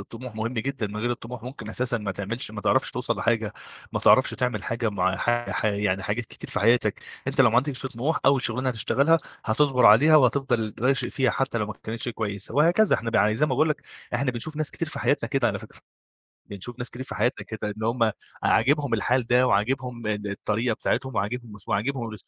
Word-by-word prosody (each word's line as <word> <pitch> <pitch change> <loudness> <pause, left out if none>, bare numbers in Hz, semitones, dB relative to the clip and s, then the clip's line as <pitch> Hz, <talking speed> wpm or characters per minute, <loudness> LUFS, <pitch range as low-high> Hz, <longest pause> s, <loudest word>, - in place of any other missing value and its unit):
الطموح 115 +4 -9
مهم 110 +3 -3
جدًا، 135 -1 -2
من 105 +1 -7
غير 120 +3 -1
الطموح 120 -1 -6
ممكن 125 -3 -8
أساسًا 120 +1 0
ما 100 -2 -3
تعملش 105 +5 -4
ما 105 -1 -6
تعرفش 130 - +2
توصل 120 -3 -2
لحاجة، 110 0 0 0.4
ما - - 0
تعرفش - - +5
تعمل 120 -6 -2
حاجة 115 -1 -1
مع 95 -1 0
ح 120 +2 0
ح - - -2
يعني 100 -2 0
حاجات 115 +5 -2
كتير - - -11
في - - -1
حياتك. 115 -1 +3 0.3
أنت 140 0 0
لو 120 - +6
ما 115 - +1
عندكش 135 0 0
طموح، 130 +6 -1
أول 135 -1 +4
شغلانة 130 +3 +1
هتشتغلها 140 +7 +2 0.3
هتصبر 125 +1 +3
عليها 145 +10 +7
وهتفضل 125 -5 +2
راشق 130 +2 +1
فيها 130 -4 +1
حتى 135 0 -1
لو 105 - -1
ما 110 - -5
كانتش 115 +2 -3
كويسة، 105 -2 -4
وهكذا. 170 +9 +4
إحنا 115 0 -4
بع 110 -1 +3
زي 150 +7 +2
ما - - -4
باقول 145 +5 +2
لك، 150 0 -2 0.3
إحنا 130 +2 +1
بنشوف 140 +6 -4
ناس 155 -1 -1
كتير 165 - -4
في - - -6
حياتنا 145 - +1
كده 135 -4 +1
على 100 - -2
فكرة. - - -14 0.7
بنشوف 105 +5 -7
ناس 120 -1 -3
كتير 125 - -7
في 130 - -7
حياتنا 125 - 0
كده 110 -1 -4
إن 110 - -8
هُم 115 -1 +2 0.3
عاجبهم 140 +1 +2
الحال 120 +2 +1
ده، 125 +1 +4
وعاجبهم، 120 +2 0
إن 105 -1 -2
الطريقة 110 +3 -1
بتاعتهم، 130 +3 -2
وعاجبهم 110 +1 -3
س 95 - -18
وعاجبهم 115 +4 -1
ال 110 - -7
120 Hz, 215 wpm, -25 LUFS, 110-130 Hz, 0.7 s, عليها